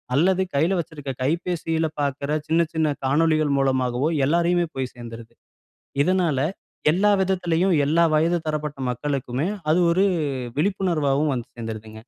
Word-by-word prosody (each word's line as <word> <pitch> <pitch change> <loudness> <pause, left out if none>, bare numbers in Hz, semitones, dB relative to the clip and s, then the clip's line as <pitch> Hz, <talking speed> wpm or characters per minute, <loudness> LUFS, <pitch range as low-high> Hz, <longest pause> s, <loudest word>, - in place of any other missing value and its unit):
அல்லது 185 +5 +3
கையில 165 +7 +2
வச்சிருக்க 150 -4 -5
கைபேசியில 165 +1 -1 0.2
பார்க்குற 140 +1 -2 0.2
சின்ன 165 +2 +3
சின்ன 155 -2 +1
காணொளிகள் 155 +1 +2
மூலமாகவோ 130 +1 +1 0.2
எல்லாரையுமே 170 +3 +2
போய் 130 -1 -3
சேர்ந்துருது. 115 -1 -10 0.7
இதனால 175 -4 +1 0.5
எல்லா 205 +4 +3
விதத்திலேயும் 180 -1 +1
எல்லா 165 +3 +3
வயது 165 +3 +2
தரப்பட்ட 150 -2 -3
மக்களுக்குமே 135 +2 -2 0.2
அது 175 +3 +4
ஒரு 190 +3 +3 0.5
விழிப்புணர்வாவும் 155 -6 +1
வந்து 120 0 -5
சேர்ந்துருதுங்க. 110 -1 -7
155 Hz, 120 wpm, -23 LUFS, 135-170 Hz, 0.7 s, அது